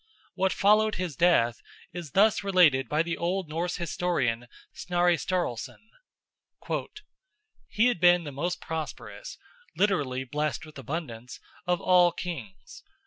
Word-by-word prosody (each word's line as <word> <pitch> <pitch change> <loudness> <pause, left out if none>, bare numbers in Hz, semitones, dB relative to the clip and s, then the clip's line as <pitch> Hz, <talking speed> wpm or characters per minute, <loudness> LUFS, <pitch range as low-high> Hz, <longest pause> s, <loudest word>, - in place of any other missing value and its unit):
What 190 0 +1
followed 215 +2 +3
his 180 -5 -4
death 120 -10 +3 0.3
is 170 -5 -7
thus 210 +2 +4
related 175 -9 +4
by 155 +2 +2
the 170 0 -3
old 180 +1 -1
Norse 170 +3 -2
historian 140 -9 -1 0.3
Snorri 175 -1 +1
Sturluson: 170 -8 -3 1.9
"He 220 +2 +1
had 245 -7 +2
been 175 0 +5
the 145 - -6
most 170 +6 -3
prosperous 160 - -6 0.4
(literally, 145 -11 +1
blessed 150 +5 -3
with 155 -2 -12
abundance) 125 -4 -6 0.3
of 180 -1 +1
all 180 -1 +5
kings. 135 - -8
170 Hz, 125 wpm, -27 LUFS, 145-180 Hz, 1.9 s, been